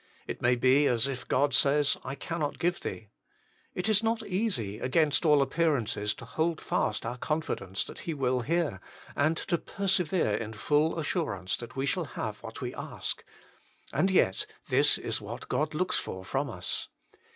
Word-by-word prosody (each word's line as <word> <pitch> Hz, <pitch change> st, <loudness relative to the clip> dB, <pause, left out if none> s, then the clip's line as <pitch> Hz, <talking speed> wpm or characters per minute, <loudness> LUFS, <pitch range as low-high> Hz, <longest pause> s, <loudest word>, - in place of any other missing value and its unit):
It -, -, -5 dB
may 120 Hz, +1 st, +4 dB
be 130 Hz, +4 st, +4 dB
as 120 Hz, 0 st, +3 dB
if 130 Hz, -2 st, -5 dB
God 140 Hz, +1 st, +2 dB
says, 140 Hz, +2 st, +4 dB
" -, -, -23 dB
I 135 Hz, +2 st, -4 dB
cannot 150 Hz, 0 st, -3 dB
give 175 Hz, +1 st, 0 dB
thee." 105 Hz, -2 st, -6 dB, 0.6 s
It 180 Hz, -, 0 dB
is 215 Hz, -1 st, +5 dB
not 225 Hz, 0 st, 0 dB
easy, 180 Hz, -, -1 dB
against 150 Hz, +4 st, +2 dB
all 145 Hz, -2 st, +6 dB
appearances, 130 Hz, -10 st, 0 dB
to -, -, -10 dB
hold 160 Hz, 0 st, 0 dB
fast 105 Hz, -, -1 dB
our 120 Hz, +2 st, -4 dB
confidence 150 Hz, -, -2 dB
that -, -, -9 dB
He 165 Hz, -, -4 dB
will 130 Hz, -2 st, +1 dB
hear, 150 Hz, -, 0 dB, 0.3 s
and 155 Hz, +3 st, +2 dB
to 170 Hz, -2 st, -1 dB
persevere 185 Hz, -, +1 dB
in 110 Hz, +1 st, -2 dB
full 150 Hz, +8 st, +2 dB
assurance 110 Hz, -, -1 dB
that 120 Hz, -1 st, -8 dB
we 135 Hz, 0 st, -1 dB
shall 140 Hz, -, 0 dB
have -, -, -5 dB
what -, -, -8 dB
we -, -, -3 dB
ask. -, -, -4 dB, 0.7 s
And 190 Hz, -, +3 dB
yet 135 Hz, -, +3 dB, 0.2 s
this -, -, +4 dB
is -, -, -2 dB
what -, -, -7 dB
God 155 Hz, +1 st, 0 dB
looks 185 Hz, +3 st, +1 dB
for 95 Hz, 0 st, -6 dB
from 135 Hz, +7 st, -1 dB
us. 90 Hz, -6 st, -2 dB
145 Hz, 175 wpm, -29 LUFS, 120-165 Hz, 0.7 s, all